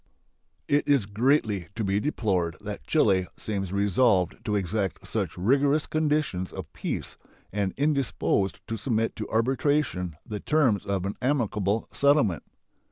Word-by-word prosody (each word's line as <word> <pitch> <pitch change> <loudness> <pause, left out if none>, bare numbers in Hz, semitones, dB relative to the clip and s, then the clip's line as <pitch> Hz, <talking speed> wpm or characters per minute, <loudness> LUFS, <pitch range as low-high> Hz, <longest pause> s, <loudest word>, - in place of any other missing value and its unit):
It 145 +1 +2
is 140 -8 +4
greatly 105 - +1
to 115 - -2
be 100 0 +1
deplored 95 - -1
that 105 -1 -7
Chile 95 - +3
seems 95 -4 -2
resolved 100 -1 +2
to 105 - 0
exact 95 -2 -2
such - - -2
rigorous 140 +9 +2
conditions 150 -12 0
of - - -8
peace - - -4 0.4
and 100 -2 0
indisposed 140 -8 0
to 115 - -3
submit 115 0 0
to 110 - -5
arbitration 115 - 0
the 105 -1 -5
terms 130 - +2
of 95 -2 -1
an 100 - -3
amicable 110 -6 0
settlement. 140 - +3
105 Hz, 135 wpm, -27 LUFS, 95-140 Hz, 0.4 s, is